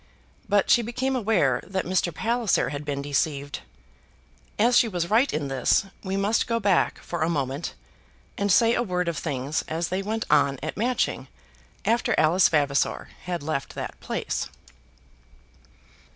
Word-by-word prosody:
But 205 Hz, -1 st, +3 dB
she 240 Hz, -, +6 dB
became 255 Hz, +3 st, -2 dB
aware 205 Hz, -, +2 dB
that 190 Hz, -1 st, -3 dB
Mr. 180 Hz, -1 st, +1 dB
Palliser 225 Hz, -, +1 dB
had 145 Hz, +1 st, -5 dB
been 140 Hz, -1 st, -3 dB
deceived. 145 Hz, 0 st, -1 dB, 1.0 s
As 240 Hz, +4 st, +4 dB
she 240 Hz, -, +5 dB
was 175 Hz, -4 st, -3 dB
right 240 Hz, +6 st, +4 dB
in 150 Hz, -2 st, -2 dB
this 135 Hz, -, +2 dB, 0.2 s
we 190 Hz, 0 st, -2 dB
must 205 Hz, +3 st, +1 dB
go 230 Hz, 0 st, 0 dB
back 200 Hz, -4 st, +2 dB
for 175 Hz, -, -4 dB
a 160 Hz, -, +2 dB
moment, 140 Hz, -1 st, -2 dB, 0.6 s
and 200 Hz, 0 st, 0 dB
say 230 Hz, +4 st, +5 dB
a -, -, +1 dB
word 180 Hz, -5 st, -1 dB
of 170 Hz, -, -1 dB
things 140 Hz, -1 st, -2 dB
as 165 Hz, +1 st, -2 dB
they 185 Hz, +2 st, -1 dB
went 220 Hz, +3 st, -2 dB
on 140 Hz, -1 st, +3 dB
at 155 Hz, -, -3 dB
Matching 245 Hz, +4 st, -1 dB, 0.6 s
after 235 Hz, +2 st, +2 dB
Alice 170 Hz, +4 st, +5 dB
Vavasor 145 Hz, -3 st, +1 dB, 0.2 s
had 175 Hz, -4 st, -3 dB
left 145 Hz, -2 st, -3 dB
that -, -, -6 dB
place. -, -, -3 dB
180 Hz, 155 wpm, -25 LUFS, 145-220 Hz, 1.0 s, she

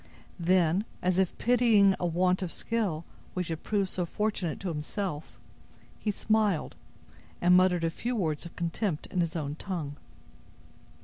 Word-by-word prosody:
Then, 175 Hz, +2 st, +3 dB, 0.2 s
as 185 Hz, 0 st, +2 dB
if 190 Hz, -2 st, +1 dB
pitying 225 Hz, -5 st, +5 dB
a 175 Hz, -, 0 dB
want 180 Hz, +2 st, +2 dB
of 180 Hz, -3 st, -2 dB
skill 200 Hz, -9 st, -1 dB, 0.3 s
which 180 Hz, -2 st, -2 dB
had 160 Hz, -1 st, -3 dB
proved 200 Hz, -3 st, 0 dB
so 180 Hz, -, -2 dB
fortunate 185 Hz, -2 st, -2 dB
to 195 Hz, -, -2 dB
himself, 160 Hz, +1 st, -4 dB, 0.6 s
he 215 Hz, -, -2 dB
smiled, 210 Hz, -4 st, +1 dB, 0.6 s
and 180 Hz, +1 st, +5 dB
muttered 180 Hz, -2 st, +4 dB
a 165 Hz, -, +1 dB
few 245 Hz, +8 st, -3 dB
words 160 Hz, -8 st, -1 dB
of 170 Hz, -, -10 dB
contempt 170 Hz, 0 st, -2 dB
in 180 Hz, -, +1 dB
his 170 Hz, -1 st, -1 dB
own 145 Hz, -3 st, -2 dB
tongue. 160 Hz, -7 st, -4 dB
180 Hz, 150 wpm, -29 LUFS, 165-200 Hz, 0.6 s, pitying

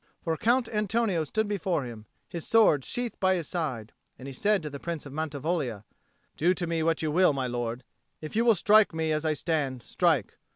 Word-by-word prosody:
For 165 Hz, -1 st, 0 dB
Count 240 Hz, +7 st, +2 dB
Antonio 210 Hz, -4 st, 0 dB
stood 220 Hz, +7 st, -1 dB
before 190 Hz, -6 st, -1 dB
him, 115 Hz, -3 st, -9 dB, 0.2 s
his 170 Hz, -2 st, -6 dB
sword 210 Hz, -, +4 dB
sheathed 245 Hz, -, -4 dB
by 190 Hz, 0 st, +3 dB
his 170 Hz, -4 st, -3 dB
side. 130 Hz, -, -3 dB, 0.2 s
And 130 Hz, -, -10 dB
he 135 Hz, -, -7 dB
said 205 Hz, +6 st, +1 dB
to 150 Hz, -, -4 dB
the 140 Hz, -, -7 dB
Prince 170 Hz, -2 st, -5 dB
of 140 Hz, -, -9 dB
Mantivoglia, 150 Hz, -, -2 dB, 0.5 s
"Do 175 Hz, +4 st, +2 dB
to 180 Hz, -, -3 dB
me 165 Hz, -1 st, -1 dB
what 165 Hz, 0 st, +1 dB
you 155 Hz, -, 0 dB
will, 180 Hz, -1 st, +4 dB
my 135 Hz, -2 st, -2 dB
lord. 120 Hz, 0 st, -3 dB, 0.4 s
If 155 Hz, +4 st, -8 dB
you 230 Hz, -, +3 dB
will 230 Hz, -2 st, +5 dB
strike 210 Hz, 0 st, +4 dB
me 160 Hz, -1 st, 0 dB
as 155 Hz, +1 st, -1 dB
I 155 Hz, -, +2 dB
stand, 145 Hz, -5 st, -2 dB
strike. 160 Hz, -, 0 dB
160 Hz, 210 wpm, -28 LUFS, 140-190 Hz, 0.5 s, will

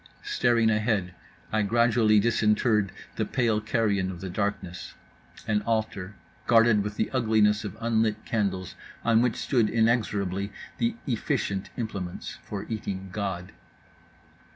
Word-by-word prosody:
Staring 115 Hz, -2 st, +2 dB
ahead, 105 Hz, -4 st, 0 dB, 0.4 s
I 110 Hz, -, +2 dB
gradually 115 Hz, 0 st, +4 dB
disinterred 105 Hz, -1 st, +2 dB, 0.3 s
the -, -, +1 dB
pale 115 Hz, -4 st, +1 dB
carrion 105 Hz, -4 st, +1 dB
of 90 Hz, -2 st, -6 dB
the 95 Hz, 0 st, -5 dB
darkness—an 100 Hz, +2 st, -4 dB
altar, 110 Hz, -3 st, -2 dB, 0.3 s
guarded 115 Hz, -2 st, +5 dB
with 105 Hz, 0 st, -4 dB
the -, -, -1 dB
ugliness 110 Hz, -4 st, +3 dB
of 105 Hz, -3 st, -6 dB
unlit 110 Hz, -2 st, 0 dB
candles, 95 Hz, -5 st, -1 dB, 0.3 s
on 115 Hz, -1 st, +4 dB
which 120 Hz, -2 st, +1 dB
stood 120 Hz, -6 st, +1 dB
inexorably 105 Hz, -4 st, +1 dB, 0.3 s
the 235 Hz, -1 st, +1 dB
efficient 110 Hz, -6 st, -1 dB
implements 100 Hz, -7 st, -5 dB
for 100 Hz, -1 st, -6 dB
eating 95 Hz, -4 st, -4 dB
God. 95 Hz, -3 st, -4 dB
105 Hz, 120 wpm, -27 LUFS, 100-115 Hz, 0.4 s, guarded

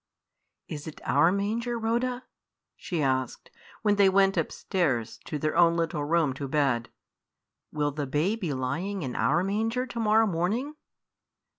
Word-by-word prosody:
"Is 145 Hz, -1 st, -7 dB
it 155 Hz, -, -8 dB
our 145 Hz, +6 st, +4 dB
manger, 225 Hz, +5 st, -1 dB
Rhoda?" 240 Hz, +3 st, -1 dB, 0.5 s
she 170 Hz, -5 st, -3 dB
asked, 130 Hz, -2 st, -1 dB, 0.3 s
when 205 Hz, -1 st, +3 dB
they 200 Hz, -1 st, +6 dB
went 195 Hz, 0 st, +3 dB
upstairs 155 Hz, -, -1 dB
to 150 Hz, -, -3 dB
their 155 Hz, +2 st, -1 dB
own 170 Hz, 0 st, +5 dB
little 165 Hz, -3 st, -1 dB
room 155 Hz, -2 st, +2 dB
to 140 Hz, +1 st, -5 dB
bed. 135 Hz, -5 st, +1 dB, 0.8 s
"Will 145 Hz, -1 st, 0 dB
the 145 Hz, 0 st, -4 dB
babe 165 Hz, -, 0 dB
be 175 Hz, -7 st, -2 dB
lying 160 Hz, +10 st, -2 dB
in 130 Hz, -3 st, -4 dB
our 175 Hz, -, +2 dB
manger 225 Hz, +6 st, -1 dB
to 240 Hz, -2 st, -6 dB
morrow 220 Hz, 0 st, +4 dB
morning?" 210 Hz, -, -1 dB
170 Hz, 150 wpm, -27 LUFS, 145-210 Hz, 0.8 s, they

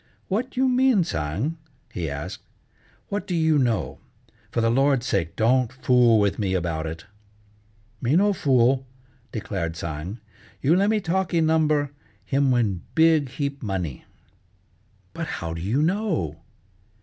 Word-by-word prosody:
"What 235 Hz, +7 st, -2 dB
you 260 Hz, +1 st, +3 dB
mean, 255 Hz, -5 st, +4 dB
Tsang?" 100 Hz, -, -2 dB, 0.4 s
he 85 Hz, -4 st, -3 dB
asked. 70 Hz, 0 st, -6 dB, 0.7 s
"What 200 Hz, -2 st, -3 dB
do 180 Hz, -, -1 dB
you 160 Hz, -2 st, +3 dB
know? 110 Hz, -, 0 dB, 0.5 s
For -, -, -2 dB
the 115 Hz, 0 st, +2 dB
Lord's 135 Hz, 0 st, +2 dB
sake 85 Hz, -8 st, -1 dB
don't 120 Hz, +1 st, +2 dB
fool 125 Hz, -3 st, +4 dB
with 100 Hz, 0 st, +1 dB
me 95 Hz, -3 st, 0 dB
about 85 Hz, -3 st, -2 dB
it!" 80 Hz, +1 st, -7 dB, 1.0 s
"Me 130 Hz, +5 st, +2 dB
no 205 Hz, +3 st, +4 dB
fool," 130 Hz, -4 st, +2 dB, 0.4 s
declared 95 Hz, -7 st, -3 dB
Tsang. 85 Hz, +6 st, -5 dB, 0.4 s
"You 150 Hz, +5 st, +3 dB
le' 195 Hz, +2 st, +3 dB
me 215 Hz, 0 st, +2 dB
talkee 180 Hz, -1 st, 0 dB
number, 155 Hz, -3 st, +2 dB, 0.3 s
him 140 Hz, 0 st, +2 dB
win 110 Hz, -8 st, +1 dB
big 160 Hz, -4 st, +4 dB
heap 140 Hz, +1 st, -4 dB
money." 95 Hz, -, -4 dB, 1.1 s
"But -, -, -4 dB
how 85 Hz, -1 st, -4 dB
do 85 Hz, -, -6 dB
you 115 Hz, -, +1 dB
know?" 170 Hz, -, -1 dB
130 Hz, 140 wpm, -24 LUFS, -, 1.1 s, mean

